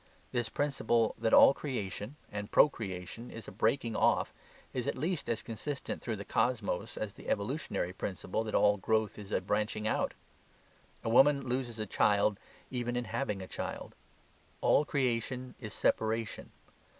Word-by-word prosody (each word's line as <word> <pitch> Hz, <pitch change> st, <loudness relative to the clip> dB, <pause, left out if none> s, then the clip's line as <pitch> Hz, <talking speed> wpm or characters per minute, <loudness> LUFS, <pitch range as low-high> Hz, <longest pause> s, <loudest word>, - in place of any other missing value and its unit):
This 120 Hz, -2 st, -1 dB
principle 120 Hz, -6 st, +1 dB
that 110 Hz, -, +1 dB
all -, -, +9 dB
creation 120 Hz, -3 st, -4 dB, 0.2 s
and 105 Hz, 0 st, -4 dB
procreation 110 Hz, -3 st, +1 dB
is 115 Hz, -, -9 dB
a -, -, -7 dB
breaking 115 Hz, 0 st, +1 dB
off -, -, +2 dB, 0.4 s
is 125 Hz, -2 st, -2 dB
at -, -, -1 dB
least 170 Hz, +1 st, -1 dB
as 115 Hz, -2 st, -1 dB
consistent 130 Hz, +5 st, -4 dB
through 115 Hz, -, -2 dB
the 100 Hz, -1 st, -7 dB
cosmos 110 Hz, -2 st, 0 dB
as 105 Hz, -2 st, -3 dB
the -, -, -9 dB
evolutionary 100 Hz, -, -1 dB
principle 95 Hz, +3 st, -3 dB
that 110 Hz, -, -2 dB
all 105 Hz, 0 st, +5 dB
growth 110 Hz, +1 st, 0 dB
is 105 Hz, 0 st, -9 dB
a -, -, +1 dB
branching 105 Hz, +2 st, -1 dB
out. -, -, 0 dB, 0.9 s
A -, -, -1 dB
woman 135 Hz, +3 st, +5 dB
loses 120 Hz, -2 st, -2 dB
a 110 Hz, -, -2 dB
child 105 Hz, 0 st, +3 dB, 0.3 s
even 120 Hz, -1 st, -2 dB
in 125 Hz, 0 st, -1 dB
having 105 Hz, -2 st, -2 dB
a -, -, -8 dB
child. -, -, -5 dB, 0.7 s
All 150 Hz, -, +4 dB
creation 130 Hz, -2 st, -1 dB
is 110 Hz, -4 st, -6 dB
separation. 110 Hz, +1 st, 0 dB
115 Hz, 155 wpm, -32 LUFS, 105-125 Hz, 0.9 s, all